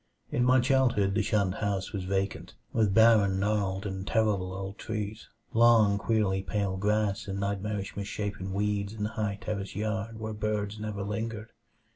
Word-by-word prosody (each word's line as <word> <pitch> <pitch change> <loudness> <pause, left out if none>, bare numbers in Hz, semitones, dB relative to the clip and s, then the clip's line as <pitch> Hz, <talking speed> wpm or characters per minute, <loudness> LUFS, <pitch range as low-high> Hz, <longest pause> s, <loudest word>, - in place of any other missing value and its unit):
In 120 - +1
my 130 +1 +5
childhood 125 -6 +3
the 105 - +2
shunned 100 -3 +1
house 100 -1 -2
was 95 -3 -3
vacant, 95 +1 -2 0.2
with 110 -3 +3
barren, 105 -3 +5
gnarled 100 -1 0
and 95 0 -4
terrible 105 -5 +1
old 95 +1 -6
trees, 110 -1 -5 0.2
long, 115 -3 +5
queerly 105 -4 +1
pale 95 +1 -1
grass 105 +1 0
and 100 0 -3
nightmarishly 100 0 -3
misshapen 100 -1 -4
weeds 100 +1 -1
in 110 -2 -4
the 105 - 0
high 105 -3 -2
terraced 100 -3 -4
yard 110 +1 -3
where 110 0 -4
birds 105 0 -2
never 105 -2 -4
lingered. 110 +2 -4
105 Hz, 160 wpm, -29 LUFS, 100-110 Hz, 0.2 s, my